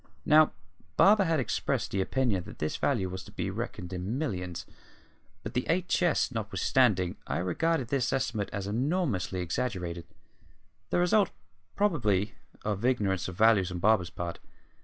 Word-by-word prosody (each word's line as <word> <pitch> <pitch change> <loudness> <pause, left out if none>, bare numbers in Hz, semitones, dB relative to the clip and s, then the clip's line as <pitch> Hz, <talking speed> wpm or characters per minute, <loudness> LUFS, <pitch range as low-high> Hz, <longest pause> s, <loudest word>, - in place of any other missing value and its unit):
Now, 155 0 +6 0.4
Barber 200 0 +6
had 165 -2 +2
expressed 130 - -1
the 95 - 0
opinion 105 -4 0
that - - -10
this 75 - -2
value 115 -10 0
was 95 0 -6
to - - -13
be - - -3
reckoned 90 +1 -5
in 95 +7 -3
millions; 90 - -3 0.8
but, 105 - -6
the 125 0 0
eight 180 +2 +1
chests 175 -6 +2
notwithstanding, 110 -3 +1
I 70 - -1
regarded 125 - 0
this 130 -2 +1
estimate 120 -6 -1
as 100 -1 -4
enormously 110 - -1
exaggerated, 85 -2 -3 0.8
the - - +1
result, 180 +3 +3 0.5
probably, 110 - +1 0.3
of 105 0 -2
ignorance 100 -7 +1
of 95 - -6
values 105 -3 +4
on 90 - -4
Barber's 95 -1 +3
part. 85 -1 -5
110 Hz, 150 wpm, -29 LUFS, 90-135 Hz, 0.8 s, Now